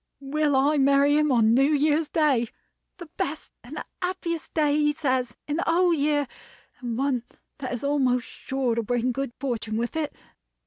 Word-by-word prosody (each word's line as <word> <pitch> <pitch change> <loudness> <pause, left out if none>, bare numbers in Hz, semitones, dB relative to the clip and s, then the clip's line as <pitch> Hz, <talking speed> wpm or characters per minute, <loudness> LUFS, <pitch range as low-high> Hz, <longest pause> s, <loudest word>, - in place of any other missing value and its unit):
will 295 +1 +1
I 285 +3 +3
marry 280 +1 +4
him 300 -1 +3
on 225 -3 +4
New 270 +4 +4
Year's 300 +1 +2
Day; 280 -7 +2 0.5
the 350 - -8
best - - -3
and - - -7 0.2
happiest 355 -3 -3
day, 300 -2 +3
he 295 0 +2
says, 255 -5 -1
in 295 +1 -1
the 340 - 0
whole 345 +1 +3
year, 290 -2 +1 0.5
and 240 -3 -4
one 270 -2 0 0.4
that 260 -3 -4
is 245 +1 -4
almost 260 -4 +1
sure 265 -3 -2
to 230 - 0
bring 245 +2 0
good 270 0 -3
fortune 230 -5 -2
with 235 +4 -2
it. 310 -2 -2
280 Hz, 175 wpm, -25 LUFS, 250-300 Hz, 0.5 s, marry